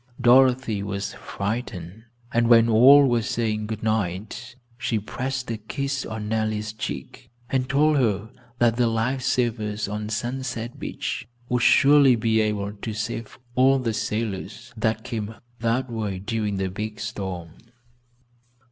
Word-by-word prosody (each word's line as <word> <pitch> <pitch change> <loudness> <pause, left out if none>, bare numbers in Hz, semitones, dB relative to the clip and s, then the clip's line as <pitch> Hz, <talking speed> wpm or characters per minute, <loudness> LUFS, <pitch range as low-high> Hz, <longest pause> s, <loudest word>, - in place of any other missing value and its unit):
Dorothy 125 -3 +4
was 100 0 -4
frightened, 100 -2 -5 0.3
and 115 0 +3
when 115 -1 +6
all 135 +5 +7
were 120 -2 +2
saying 110 -1 -1
good 110 0 -5
night 110 +3 -2 0.2
she 120 -2 -1
pressed 130 +4 -4
a 115 - -2
kiss 135 +5 -3
on 110 -1 -5
Nellie's 110 0 -1
cheek, 115 +3 -6 0.2
and 130 -1 0
told 150 +2 +3
her 110 -4 0 0.3
that 120 -1 +3
the 120 -1 +3
life 115 +4 0
savers 110 -4 0
on 105 +1 -4
Sunset 120 0 -4
Beach - - -4 0.2
would 125 -1 +1
surely 140 -1 +6
be 110 -1 +2
able 105 -1 -1
to 105 +2 -6
save 115 +1 -4 0.2
all 130 +2 +5
the 120 -4 -1
sailors 110 +2 -4
that 110 -1 -1
came 115 -3 -4 0.2
that 115 +3 0
way 105 -4 -3
during 105 +1 -2
the 95 -1 -2
big 105 +2 -5
storm. 95 -5 -5
110 Hz, 140 wpm, -24 LUFS, 105-125 Hz, 0.3 s, all